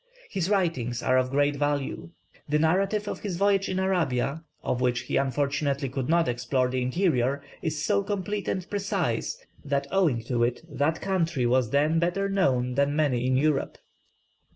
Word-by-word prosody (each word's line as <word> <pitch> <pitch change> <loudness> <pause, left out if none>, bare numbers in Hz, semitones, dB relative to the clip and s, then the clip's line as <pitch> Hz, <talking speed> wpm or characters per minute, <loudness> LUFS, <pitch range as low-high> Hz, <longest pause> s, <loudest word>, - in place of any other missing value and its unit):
His 185 -1 -1
writings 145 - 0
are 130 - +3
of 130 0 +2
great 145 +1 +1
value; 145 +1 -2 0.4
the 150 - +3
narrative 195 +6 +1
of - - -4
his 190 -5 -4
voyage 195 0 +2
in 185 - -1
Arabia 160 -6 0 0.2
of 125 - -1
which 125 -1 +1
he 130 - -4
unfortunately 140 0 0
could 135 +1 -3
not 170 0 +3
explore 125 +1 0
the 130 0 -1
interior 135 -1 +1 0.2
is 155 -2 -2
so 200 -1 +2
complete 205 0 -3
and 185 -1 -2
precise, 195 - -2 0.2
that 140 -1 -1
owing 160 -12 +2
to 120 0 0
it 120 +1 0
that 155 +1 -1
country 170 -9 0
was 125 -1 +2
then 150 +5 +2
better 175 +4 0
known 130 -11 +1
than 140 +2 +1
many 130 -5 +1
in 130 0 +2
Europe. 145 0 +1
145 Hz, 170 wpm, -27 LUFS, 130-185 Hz, 0.4 s, are